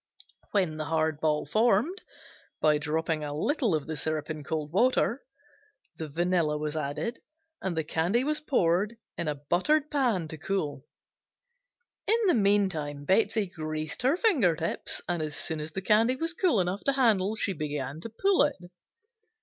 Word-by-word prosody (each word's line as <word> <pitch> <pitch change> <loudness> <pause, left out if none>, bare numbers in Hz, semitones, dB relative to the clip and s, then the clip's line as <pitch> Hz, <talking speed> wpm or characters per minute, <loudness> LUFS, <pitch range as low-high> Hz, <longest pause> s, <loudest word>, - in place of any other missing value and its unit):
When 180 -7 0
the 155 - -3
hard 160 -1 0
ball 150 -1 +1
formed, 230 - +2 0.6
by 150 -1 +3
dropping 155 +1 -1
a 145 0 -4
little 240 - +1
of 150 -2 -2
the 160 - -4
syrup 155 +1 -2
in 155 -1 -6
cold 150 0 -3
water, 245 +5 +2 0.8
the 160 - -4
vanilla 170 -1 +1
was 150 0 -3
added 155 - -3 0.4
and 180 -3 -2
the 160 - +1
candy 170 +10 +1
was 300 +2 0
poured 205 - +1 0.2
in 170 - -3
a 150 - 0
buttered 185 - +1
pan 240 - +1
to 160 - -7
cool. 150 -7 -2 1.2
In 445 - +4
the 365 - +5
meantime 190 - +1
Betsey 215 +4 +3
greased 155 -2 -4
her 265 +6 +3
finger 275 - +3
tips, 160 +2 -2
and 175 -2 -1
as 155 -1 -3
soon 160 -2 -1
as 150 +1 -5
the 190 +3 -5
candy 225 +5 +4
was 325 +4 -2
cool 350 - +2
enough 185 +2 -1
to 275 - +3
handle 220 -6 +3
she 205 -3 0
began 150 -2 -4
to 230 - -6
pull 385 - +2
it. 290 -1 +2
175 Hz, 165 wpm, -28 LUFS, 155-230 Hz, 1.2 s, the